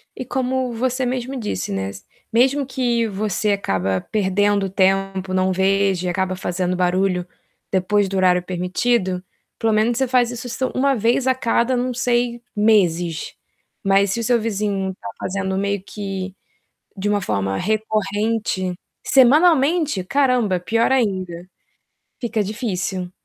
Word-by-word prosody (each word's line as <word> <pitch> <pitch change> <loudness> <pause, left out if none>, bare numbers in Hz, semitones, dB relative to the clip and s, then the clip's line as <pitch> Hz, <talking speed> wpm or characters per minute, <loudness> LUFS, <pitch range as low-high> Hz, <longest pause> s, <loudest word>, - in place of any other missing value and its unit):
E 255 - -6
como 255 0 -1
você 255 +2 -1
mesmo 255 +1 -3
disse, 100 - -3
né, 95 0 -2
s 100 0 -10 0.3
mesmo 265 +5 +3
que 245 -3 0
você 210 0 -1
acaba 95 - -1
perdendo 205 -1 +1
tempo, 190 0 +1
não 185 0 +2
veja 190 -1 +1
e - - +1
acaba 185 +1 -1
fazendo 180 0 -2
barulho 180 0 +1 0.4
depois 195 +2 +2
do 195 0 -3
horário 180 -1 +3
permitido, 185 +1 -1 0.3
pelo 225 -1 +1
menos 220 +2 +2
você 265 0 +1
faz 245 -1 +3
isso 240 0 -7
s 255 +2 -4
1 275 +1 +2
vez 235 +3 +1
a 260 - +5
cada, 240 0 +1
não 250 0 -1
sei, 240 -1 0
meses. 175 -6 +2 0.5
Mas 195 0 +3
se 235 - -1
o - - -2
seu 240 +1 +3
vizinho 200 -3 -1
tá - - -7
fazendo 190 0 -2
meio 200 0 -1
que 195 -2 -5 0.6
de 200 +2 -1
uma 205 -1 +1
forma 95 - -1
recorrente 215 -2 -1 0.3
Semanalmente? 295 - +4
Caramba, 250 -5 +2
pior 230 +7 +1
ainda. 185 -8 -1 0.7
Fica 230 -3 -1
difícil. 190 -4 -3
205 Hz, 140 wpm, -21 LUFS, 185-240 Hz, 0.7 s, a